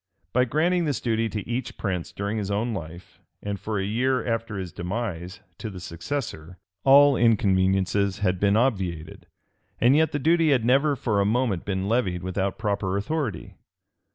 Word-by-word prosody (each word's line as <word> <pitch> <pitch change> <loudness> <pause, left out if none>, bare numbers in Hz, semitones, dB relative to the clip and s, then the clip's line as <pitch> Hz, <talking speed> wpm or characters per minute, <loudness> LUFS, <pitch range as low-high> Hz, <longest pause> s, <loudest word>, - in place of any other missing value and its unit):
By 125 +1 +3
granting 170 +6 +1
this 145 -6 -1
duty 115 -1 0
to 105 -2 -5
each 120 +1 -4
prince 90 -5 -3
during 100 +2 -3
his 100 -2 -3
own 110 +4 -1
life, 85 -1 -8 0.2
and 100 -1 -3
for 105 +3 -3
a 95 - -1
year 125 +4 0
after 115 -3 -2
his 95 -2 -5
demise 90 -1 -4 0.2
to 110 - -5
the 95 -3 -8
successor, 90 - -5 0.3
all 140 +1 +7
inconveniencies 95 -3 +2
had 90 -3 0
been 100 +1 +3
obviated; 95 -10 -1 0.5
and 125 +4 +5
yet 160 0 +3
the - - -1
duty 165 +3 +3
had 120 -4 +1
never 140 +4 +3
for 110 -6 0
a - - +2
moment 110 -4 0
been 95 -1 -2
levied 95 -6 0
without 95 +1 -2
proper 100 -2 -1
authority. 140 +1 -3
105 Hz, 170 wpm, -25 LUFS, 95-125 Hz, 0.5 s, all